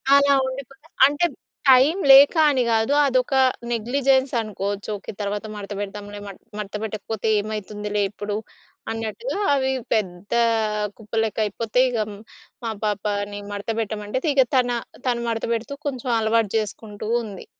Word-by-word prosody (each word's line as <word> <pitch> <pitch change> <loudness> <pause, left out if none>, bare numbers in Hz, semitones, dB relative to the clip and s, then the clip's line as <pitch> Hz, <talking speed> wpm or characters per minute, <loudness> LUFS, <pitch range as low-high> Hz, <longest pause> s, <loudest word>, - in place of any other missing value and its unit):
అలా 280 0 +5
ఉండిపోతాయి. 275 +3 -9
అంటే, 290 +4 +1 0.4
టైం 265 +7 +6
లేక 275 +4 +9 0.2
అని 260 - +1
గాదు. 225 +4 +2
అదొక 255 0 +1 0.4
నెగ్లిజెన్సనుకోచ్చు. 235 -5 0
ఓకే, - - -8
తర్వాత 205 +1 -3
మడతపెడదాంలే 205 0 -6
మడ్ 195 - -10 0.2
మడతపెట్టకపోతే 215 +1 -4
ఏమయితుందిలే 210 0 -3
ఇప్పుడు 205 0 -4 0.6
అన్నట్టుగా 225 - -4 0.2
అవి 265 -1 +1 0.2
పెద్దా 205 +2 0 0.6
కుప్పలెక్కయిపోతయి. 220 +2 0
ఇగ 240 - -2 0.7
మా 225 - -1
పాపని 205 0 -2
మడతపెట్టమంటే, 210 +2 -3
ఇగ 265 -2 +5
తన 245 -1 +2 0.4
తను 235 -1 0
మడతపెడుతూ 230 +3 -2
కొంచుం 255 -2 -3
అలవాటు 220 -1 +1
చేసుకుంటూ 210 0 -6 0.2
ఉంది. 200 -3 -9
220 Hz, 110 wpm, -23 LUFS, 205-255 Hz, 0.7 s, లేక